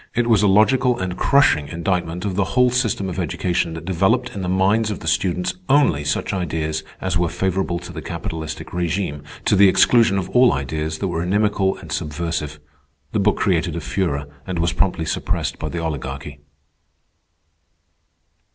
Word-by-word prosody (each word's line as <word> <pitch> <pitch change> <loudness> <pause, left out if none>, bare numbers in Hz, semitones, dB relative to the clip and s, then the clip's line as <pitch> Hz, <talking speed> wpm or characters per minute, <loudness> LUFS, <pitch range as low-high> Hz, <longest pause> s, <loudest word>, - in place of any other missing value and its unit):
It 120 0 +2
was 115 -4 +4
a 105 - +4
logical 120 +5 +4
and 95 -1 -3
crushing 140 - +3
indictment 85 +1 -2
of 100 - -1
the 100 - +2
whole 125 -1 +5
system 115 -6 0
of 90 - -4
education 85 -2 -1
that 80 0 -8
developed 95 +8 +1
in 100 - -5
the 90 - -2
minds 100 +4 +2
of 105 - -4
the - - -7
students 90 -1 0 0.2
only 135 - +3
such - - -1
ideas 80 -4 -2 0.2
as 95 -2 -1
were 85 -1 +1
favorable 95 -1 -1
to 90 0 -9
the - - -6
capitalistic 80 -2 -6
regime, 85 -3 -2 0.2
to - - +3
the 100 0 +7
exclusion 110 +1 +4
of 95 -1 -2
all 125 0 +5
ideas 75 +3 -3
that 95 - -2
were 85 -2 -2
inimical 100 +1 +1
and - - -11
subversive. 75 -1 -3 0.5
The 110 - 0
book 100 +1 +2
created 85 -3 +1
a - - -2
furor, 85 -4 -2 0.2
and 90 -2 -3
was 85 +1 +1
promptly 90 -3 0
suppressed - - -2
by 75 - -3
the 85 - -5
Oligarchy. 70 -3 -5
90 Hz, 175 wpm, -21 LUFS, 80-100 Hz, 0.5 s, the